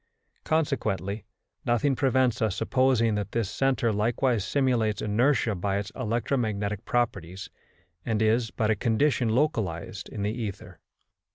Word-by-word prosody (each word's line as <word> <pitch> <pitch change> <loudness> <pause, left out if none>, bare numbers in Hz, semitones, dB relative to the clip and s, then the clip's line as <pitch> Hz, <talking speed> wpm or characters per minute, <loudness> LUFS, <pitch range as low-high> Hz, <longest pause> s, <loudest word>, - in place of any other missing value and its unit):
Consequently 110 - -1 0.4
nothing 125 +4 +2
prevents 130 -2 +2
us 110 -4 +1
supposing 130 -2 +2
that 100 -1 -3
this 115 -5 -1
centre 130 -4 +1
likewise 115 +1 +1
simulates 115 -4 +1
inertia 115 +2 +2
by 100 +1 -1
its 100 +1 -4
electromagnetic 110 -4 -1
properties, 95 -7 -2 0.5
and 110 -2 -1
is 115 +2 +2
but 110 -2 0
a - - +2
condition 120 +2 +1
localised 105 - -1
in 100 - -5
the 105 +1 0
ether. 110 -5 -6
115 Hz, 125 wpm, -27 LUFS, 105-125 Hz, 0.5 s, nothing